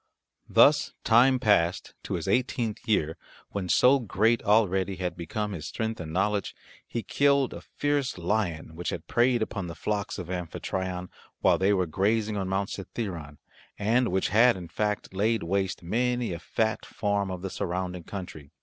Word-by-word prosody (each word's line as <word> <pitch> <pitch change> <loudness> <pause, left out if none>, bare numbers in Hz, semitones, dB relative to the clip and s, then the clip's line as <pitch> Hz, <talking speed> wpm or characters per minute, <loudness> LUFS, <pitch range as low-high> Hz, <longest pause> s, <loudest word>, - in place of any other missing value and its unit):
Thus - - +5
time 125 +3 +5
passed 105 -8 +2
to - - -2
his - - -4
eighteenth 120 -3 0
year 80 -7 +1 0.3
when, 95 -3 -3
so 130 +8 +5
great 115 0 +2
already 100 -2 +2
had 90 -1 -3
become 105 +5 -3
his 80 -5 -5
strength 110 0 -3
and 80 -2 -6
knowledge, 100 +4 0 0.3
he 115 - -4
killed 140 -2 +2
a - - -8
fierce 145 -5 -1
lion 85 -4 -2
which 90 +2 -3
had - - -5
preyed 120 -1 +2
upon 100 -4 -4
the 85 - -7
flocks 105 -1 -2
of 90 -2 -6
Amphitryon 90 +1 -4 0.3
while - - +4
they 95 +2 +3
were 95 -3 +2
grazing 105 +6 0
on 95 -2 -2
Mount 95 +1 -1
Cithaeron, 90 -8 -5 0.4
and 115 +4 +2
which 95 -1 0
had 115 +2 +5
in 85 -2 -8
fact 105 +3 -2
laid 110 +2 +1
waste 95 +1 -1
many 120 +3 0
a 85 - -5
fat 110 +5 -1
farm 100 -3 -1
of 90 -1 -5
the 95 - -4
surrounding 90 -1 -3
country. 90 -7 -8
100 Hz, 170 wpm, -27 LUFS, 90-115 Hz, 0.4 s, Thus